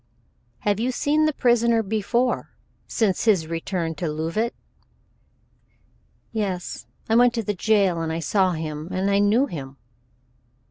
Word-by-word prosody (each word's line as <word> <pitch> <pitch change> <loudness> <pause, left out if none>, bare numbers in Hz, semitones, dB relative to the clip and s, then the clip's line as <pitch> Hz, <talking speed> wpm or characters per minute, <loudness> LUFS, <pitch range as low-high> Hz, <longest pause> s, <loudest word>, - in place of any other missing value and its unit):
"Have 205 0 +1
you 240 +3 0
seen 300 +4 +1
the 310 - +3
prisoner 235 -4 +2
before 220 +4 -1 0.3
since 215 -4 0
his 195 -8 +3
return 165 +1 -3
to 165 +2 -4
Leauvite?" 165 +10 -2 1.8
"Yes, 195 -5 -3 0.2
I 225 - +2
went 245 0 +5
to 230 - -1
the 210 - -1
jail 195 -4 +2
and 160 -1 -2
I 160 - -2
saw 185 +3 +2
him, 155 -1 -5
and 190 +2 0
I 200 - +3
knew 210 +6 +4
him." 140 - -8
200 Hz, 140 wpm, -23 LUFS, 165-230 Hz, 1.8 s, went